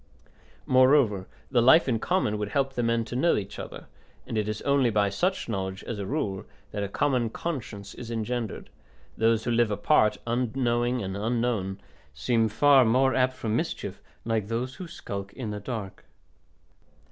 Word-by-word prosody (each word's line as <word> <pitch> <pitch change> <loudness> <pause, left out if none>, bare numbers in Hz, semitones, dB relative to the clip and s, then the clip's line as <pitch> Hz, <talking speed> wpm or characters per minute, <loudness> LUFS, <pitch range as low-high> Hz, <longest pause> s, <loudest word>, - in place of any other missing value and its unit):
Moreover 130 -7 +4 0.2
the 120 -3 +4
life 130 +7 +6
in 115 -4 +1
common 110 - 0
would 105 -1 -2
help 135 +4 0
the 125 - -1
men 115 -1 +1
to 120 - -6
know 165 +7 +3
each 100 -1 -4
other, - - -8 0.4
and - - -5
it 105 -1 0
is 105 0 -4
only 140 -3 +3
by 105 -2 +2
such 185 - -1
knowledge, 95 -3 -3
as 115 -3 -5
a 100 - -4
rule, 100 -10 -2 0.3
that 105 - -3
a 100 - -1
common 125 0 +1
conscience 110 -9 -5
is 115 - -9
engendered; 115 -1 -3 0.4
those 115 0 +2
who 120 - -1
live 120 -1 +3
apart, 105 +1 +3
unknowing 120 0 0
and 95 0 -4
unknown, 110 -3 -1 0.4
seem 115 - +1
far 135 +5 +5
more 130 +3 +3
apt 130 0 +2
for 115 -3 -4
mischief, 110 - -2 0.2
like 110 -3 0
those 120 +3 -2
who 185 - -7
skulk 100 - -7
in 120 -6 -5
the 105 - -4
dark. 105 -3 -6
115 Hz, 170 wpm, -27 LUFS, 105-130 Hz, 0.4 s, life